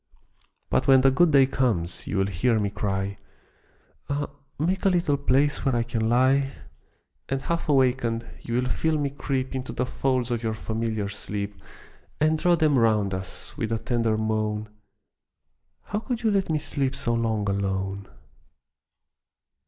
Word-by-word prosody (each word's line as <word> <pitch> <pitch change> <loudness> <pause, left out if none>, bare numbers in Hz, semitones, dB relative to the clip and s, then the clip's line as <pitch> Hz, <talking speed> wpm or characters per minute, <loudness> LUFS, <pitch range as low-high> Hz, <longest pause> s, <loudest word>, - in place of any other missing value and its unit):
But 130 - +2
when 135 -1 +7
the 135 0 +5
good 170 +6 +4
day 140 -3 +6
comes, 115 -11 -1
you 100 - -2
will 95 - +3
hear 100 +5 +1
me 100 -1 -1
cry, 100 -1 -2 0.9
"Ah, 145 0 -2 0.3
make 180 +6 0
a 195 - +5
little 175 -5 +2
place 140 +1 +2
where 135 -3 +1
I 120 - +2
can 115 -1 -1
lie!" 135 +3 +3 0.8
And 135 - 0
half 170 -2 -2
awakened, 125 -4 +2 0.2
you 115 - -4
will 125 +1 +1
feel 160 +5 0
me 145 -2 -1
creep 135 -2 -2
Into 130 -1 -4
the 125 - -1
folds 125 -1 -1
of 120 -1 -1
your 110 -1 -1
familiar 110 -1 -2
sleep, 100 0 -5 0.6
And 155 +1 +2
draw 175 +1 +4
them 155 -5 +3
round 105 -4 +2
us, 95 0 -6
with 115 - -2
a 115 - +1
tender 115 -2 0
moan, 110 -1 -1 1.1
"How 210 - -3
could 235 +1 -4
you 220 - +3
let 195 -3 +1
me 155 - +2
sleep 135 -3 -1
so 120 - -1
long 110 -3 0
alone?" 100 0 -2
125 Hz, 160 wpm, -25 LUFS, 110-140 Hz, 1.1 s, when